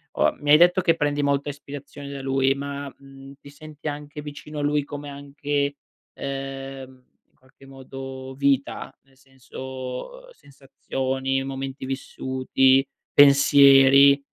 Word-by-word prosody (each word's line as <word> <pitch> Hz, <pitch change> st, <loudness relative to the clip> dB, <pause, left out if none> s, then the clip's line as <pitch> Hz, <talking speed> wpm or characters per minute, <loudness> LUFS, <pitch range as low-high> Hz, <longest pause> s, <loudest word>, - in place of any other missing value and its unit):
O -, -, +2 dB
mi 145 Hz, 0 st, 0 dB
hai 150 Hz, -, +9 dB
detto 175 Hz, +2 st, +5 dB
che 165 Hz, -2 st, +3 dB
prendi 145 Hz, -2 st, -1 dB
molta 140 Hz, +1 st, 0 dB
ispirazione 140 Hz, 0 st, -9 dB
da 140 Hz, -1 st, -7 dB
lui, 135 Hz, 0 st, +1 dB
ma, 140 Hz, 0 st, -6 dB
mhmm, 135 Hz, 0 st, -14 dB
ti 140 Hz, -, -13 dB
senti 155 Hz, +1 st, -11 dB
anche 150 Hz, 0 st, -6 dB
vicino 150 Hz, +1 st, -8 dB
a -, -, -2 dB
lui 145 Hz, 0 st, +1 dB
come 145 Hz, 0 st, -8 dB
anche, 140 Hz, 0 st, -3 dB, 0.4 s
ehm, 135 Hz, -1 st, -7 dB, 0.2 s
in -, -, -44 dB
qualche 130 Hz, +1 st, -22 dB
modo 135 Hz, 0 st, -9 dB
vita? 140 Hz, -1 st, -1 dB
Nel 135 Hz, -1 st, -29 dB
senso, 130 Hz, -, -9 dB
uhm, -, -, -18 dB
sensazioni, 135 Hz, -, -4 dB
momenti 135 Hz, 0 st, -6 dB
vissuti, 130 Hz, 0 st, +1 dB, 0.3 s
pensieri, 140 Hz, 0 st, +7 dB
140 Hz, 135 wpm, -23 LUFS, 135-145 Hz, 0.4 s, hai